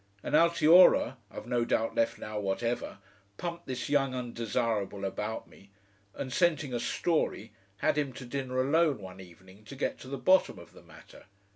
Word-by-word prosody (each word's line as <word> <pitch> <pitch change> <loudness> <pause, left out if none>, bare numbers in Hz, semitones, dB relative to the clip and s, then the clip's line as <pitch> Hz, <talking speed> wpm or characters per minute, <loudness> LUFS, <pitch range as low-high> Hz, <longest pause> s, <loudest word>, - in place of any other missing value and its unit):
And - - -5
Altiora, 170 -5 +6
I've - - -9
no 120 0 0
doubt 115 -1 0
left 115 - 0
now 105 0 -5
whatever, 115 +5 -2 0.4
pumped 170 0 -6
this 130 -2 -4
young 135 -2 +1
undesirable 115 -4 -2
about 105 +3 -4
me, 100 - -19 0.5
and 130 - -5
scenting 160 -6 +1
a 120 - -1
story, 120 - -1 0.2
had 155 +4 +1
him 140 -3 -1
to 125 - -9
dinner 130 0 -3
alone 145 +2 +2
one 95 -2 -11
evening 95 +3 -16
to 135 - -10
get 135 - -3
to - - -11
the 140 +1 -4
bottom 185 - +3
of 85 - -14
the - - -15
matter. - - -16
125 Hz, 170 wpm, -29 LUFS, 105-145 Hz, 0.5 s, Altiora